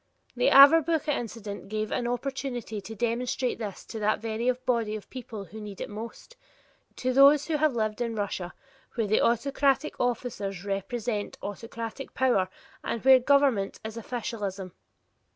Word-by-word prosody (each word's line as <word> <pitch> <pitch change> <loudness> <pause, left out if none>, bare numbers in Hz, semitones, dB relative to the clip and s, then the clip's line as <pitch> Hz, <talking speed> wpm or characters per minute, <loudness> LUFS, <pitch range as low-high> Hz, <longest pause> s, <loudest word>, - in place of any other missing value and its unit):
The - - +3
Averbuch 310 +2 +7
incident 225 -8 -4
gave 215 0 -2
an 240 - -1
opportunity 245 -3 -3
to 220 +3 -8
demonstrate 240 +3 -1
this 210 -4 -6
to 225 - -7
that 215 0 +2
very 225 +2 -1
body 245 -4 0
of 215 - -8
people 225 -5 -7
who 215 +5 -10
need 205 -2 -8
it - - -5
most; 230 - -8 0.6
to 255 0 -1
those 280 +2 +7
who 320 -2 0
have 300 -3 +2
lived 215 0 -1
in 230 -1 -1
Russia 195 -4 -3 0.4
where 225 -3 0 0.2
autocratic 275 +5 +2
officers 205 -6 -2
represent 205 +2 -3
autocratic 230 +5 -6
power 240 -8 +2 0.3
and 235 - -3
where 265 -1 +8
government 265 -6 +2
is 220 0 -5
officialism. 210 -5 -4
230 Hz, 145 wpm, -27 LUFS, 210-260 Hz, 0.6 s, where